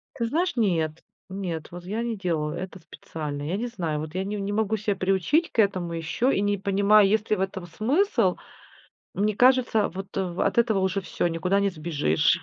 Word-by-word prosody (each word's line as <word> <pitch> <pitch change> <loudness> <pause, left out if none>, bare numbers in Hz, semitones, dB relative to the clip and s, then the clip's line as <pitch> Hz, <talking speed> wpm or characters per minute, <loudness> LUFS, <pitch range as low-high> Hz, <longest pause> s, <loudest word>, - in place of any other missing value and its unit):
Ты 235 - -1
знаешь, 335 +8 0
нет, 165 -8 0 0.3
нет, 180 -5 -4
вот 175 0 -8
я 215 +5 -2
не 230 -3 -3
делала 160 -5 -1
это 185 +1 -6
специально. 150 -2 -7
Я 175 +6 -2
не 240 +2 -2
знаю, 165 -10 -3
вот 155 +3 -7
я 190 - 0
не 205 +1 -3
не 200 0 -3
могу 220 0 0
себя 205 -1 -1
приучить 195 - +1
к - - -4
этому 185 -5 +1
ещё 165 - 0
и 195 - +1
не 205 0 +1
понимаю, 200 +1 +4
есть 215 +1 +1
ли 215 - +3
в 190 - -3
этом 190 -2 -3
смысл. 275 - +1 0.8
Мне 210 +1 0
кажется, 250 -4 +4
вот 195 +2 -8
в 180 -2 -2
от - - 0
этого 225 -4 +3
уже 190 +1 0
всё, 175 - -1
никуда 180 +4 0
не 200 0 +2
сбежишь. 155 - +1
195 Hz, 205 wpm, -25 LUFS, 170-215 Hz, 0.8 s, понимаю